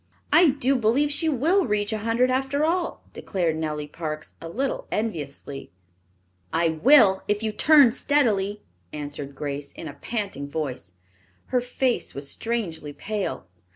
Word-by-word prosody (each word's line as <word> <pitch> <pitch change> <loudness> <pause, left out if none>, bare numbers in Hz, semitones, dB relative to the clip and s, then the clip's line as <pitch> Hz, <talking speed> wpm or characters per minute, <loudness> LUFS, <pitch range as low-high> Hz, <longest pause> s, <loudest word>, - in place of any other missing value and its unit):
"I 340 -1 +7
do 275 0 +1
believe 255 +5 +2
she 320 +3 +1
will 325 +8 +2
reach 205 +1 0
a 215 - -2
hundred 230 +4 +2
after 270 +3 +1
all," 345 +1 -1
declared 170 -5 -1
Nellie 150 -2 -3
Parks, 155 0 -6
a 165 - -7
little 265 +9 -2
enviously. 145 -9 -4 0.8
"I 165 0 +2
will, 190 - +5
if 210 +1 0
you 220 - 0
turn 285 +3 +6
steadily," 210 -7 +1 0.3
answered 145 -1 -6
Grace, 140 0 -4
in 160 - -8
a 145 - -7
panting 195 - -4
voice. 135 - -4 0.6
Her 250 -1 +2
face 250 0 -1
was 140 0 -4
strangely 185 -11 -3
pale. 205 - -4
210 Hz, 145 wpm, -25 LUFS, -, 0.8 s, I